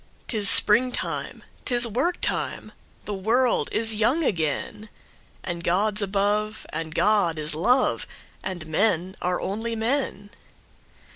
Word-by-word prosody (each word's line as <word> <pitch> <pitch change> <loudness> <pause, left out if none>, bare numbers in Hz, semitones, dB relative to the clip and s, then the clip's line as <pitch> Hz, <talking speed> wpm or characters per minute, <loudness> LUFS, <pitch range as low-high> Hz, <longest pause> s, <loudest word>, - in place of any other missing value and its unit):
'Tis 210 -4 +1
springtime! 245 +4 +4 0.2
'Tis 240 -2 +6
work 265 - -1
time! - - -1 0.3
The 210 - -5
world 230 +6 0
is 225 0 +1
young 235 +10 +1
again! 185 - -3 0.5
And 170 -2 -5
God's 205 +5 0
above, 205 +2 -1
and 160 0 -6
God 205 -6 +2
is 155 0 -2
love, 245 - +1 0.3
And 185 -4 -6
men 185 +2 0
are 180 0 -1
only 225 +4 -4
men. 225 -3 -3
210 Hz, 120 wpm, -24 LUFS, 180-230 Hz, 0.5 s, Tis